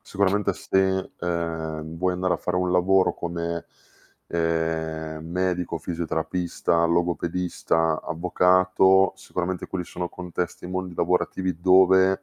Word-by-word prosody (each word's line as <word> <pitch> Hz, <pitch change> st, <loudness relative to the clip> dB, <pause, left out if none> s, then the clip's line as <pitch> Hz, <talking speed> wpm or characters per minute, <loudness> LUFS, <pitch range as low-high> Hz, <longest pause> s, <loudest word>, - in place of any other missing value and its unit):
Sicuramente 100 Hz, 0 st, 0 dB
se, 95 Hz, 0 st, 0 dB
ehm, 80 Hz, -2 st, -3 dB
vuoi 90 Hz, 0 st, +1 dB
andare 90 Hz, 0 st, 0 dB
a -, -, +1 dB
fare 90 Hz, -, -2 dB
un 90 Hz, 0 st, +1 dB
lavoro 95 Hz, +1 st, +3 dB
come, 85 Hz, -1 st, -4 dB, 0.6 s
ehm, 80 Hz, -1 st, -2 dB
medico, 90 Hz, 0 st, -1 dB
fisioterapista, 85 Hz, +1 st, -1 dB
logopedista, 85 Hz, -1 st, 0 dB
avvocato, 95 Hz, +2 st, +3 dB
sicuramente 90 Hz, -1 st, -4 dB
quelli 90 Hz, -2 st, -4 dB
sono 90 Hz, 0 st, -5 dB
contesti 90 Hz, 0 st, -5 dB
e -, -, -5 dB
mondi 95 Hz, -1 st, -4 dB
lavorativi 90 Hz, 0 st, 0 dB
dove 95 Hz, +1 st, +5 dB
90 Hz, 115 wpm, -24 LUFS, 85-95 Hz, 0.6 s, dove